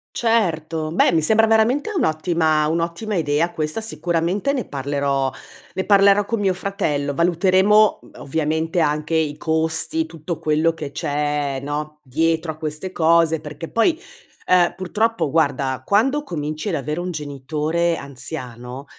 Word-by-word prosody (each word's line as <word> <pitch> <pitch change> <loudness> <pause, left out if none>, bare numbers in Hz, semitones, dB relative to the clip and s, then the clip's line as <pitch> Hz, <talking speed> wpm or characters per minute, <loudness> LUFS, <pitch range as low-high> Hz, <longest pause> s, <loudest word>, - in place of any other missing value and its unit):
Certo, 165 -9 0
beh, 165 - +3
mi 165 -2 +2
sembra 220 +7 +4
veramente 225 - +2
un'ottima 155 - +1
un'ottima 170 +6 -2
idea, 160 0 +1
questa, 155 +6 -3
sicuramente 175 - -1
ne 270 -4 -2
parlerò 140 -1 -1 0.4
ne 190 - -2
parlerò 200 0 +5
con 230 +2 -2
mio 195 -2 +1
fratello, 155 -8 -2
valuteremo, 185 +6 +4
mhmm, - - -18
ovviamente 160 +3 -1
anche 150 0 0
i 155 -2 0
costi, 160 0 -1
tutto 160 0 -6
quello 155 +1 +2
che 160 -3 -6
c'è, 145 -1 -1
no, 150 +2 -5
dietro 160 +4 0
a - - -18
queste 155 +4 -5
cose, 165 -1 +3
perché 150 +1 -8
poi, 320 +9 +2 0.5
ehm, 180 -1 +4
purtroppo 210 0 0
guarda, 140 -4 0
quando 270 +9 +2
cominci 155 - -4
ad 175 - -1
avere 150 +3 -3
un 180 +1 -3
genitore 155 +3 -1
anziano, 125 -2 -7
160 Hz, 140 wpm, -21 LUFS, 150-185 Hz, 0.5 s, parlerò